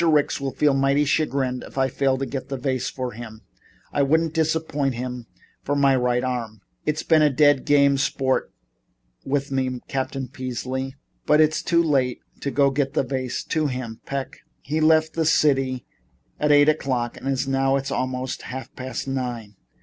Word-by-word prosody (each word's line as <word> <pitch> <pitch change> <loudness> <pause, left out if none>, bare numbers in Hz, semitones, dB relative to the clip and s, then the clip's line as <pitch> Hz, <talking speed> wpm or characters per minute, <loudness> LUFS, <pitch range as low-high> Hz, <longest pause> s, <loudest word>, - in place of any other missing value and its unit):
Ricks 150 -4 +2
will 135 -1 -3
feel 150 -2 +3
mighty 135 +2 +2
chagrined 135 -4 0
if - - -12
I 135 0 +3
fail 135 0 +1
to 135 - -2
get 135 0 -5
the 135 - -3
vase 130 -1 -2
to 125 -2 -4
him. 110 -1 -9 0.5
I 145 - +2
wouldn't 160 +3 +2
disappoint 160 -4 0
him 125 -1 -5 0.3
for 145 - -1
my 140 -1 +4
right 125 -1 +1
arm. 115 -5 -3 0.2
He's 155 +1 -1
been 160 -2 +4
a 150 - +5
dead 145 0 +3
game 140 -2 +4
sport 130 -1 0 0.7
with 140 0 -1
me, 130 -2 -1
Captain 135 0 -3
Peasley." 130 +1 -4 0.3
"But 150 - +5
it's 155 0 +3
too 170 0 +2
late 135 -6 +1 0.2
to 140 - -2 0.2
get 140 +1 -1
the - - +3
vase 130 -1 -3
to 155 -2 0
him, 125 -4 -5
Peck. 140 -1 -4 0.2
He 155 +3 -2
left 155 0 +4
the 165 - 0
city 135 -5 +2 0.5
at 150 0 +2
eight 145 0 +6
o'clock 130 -6 0
and - - -8
it 135 - +2
is 135 +1 -2
now 135 0 +2
almost 130 0 -2
half 130 +1 -7
past 130 +1 -5
nine." 120 -6 -4
135 Hz, 175 wpm, -23 LUFS, 130-145 Hz, 0.7 s, eight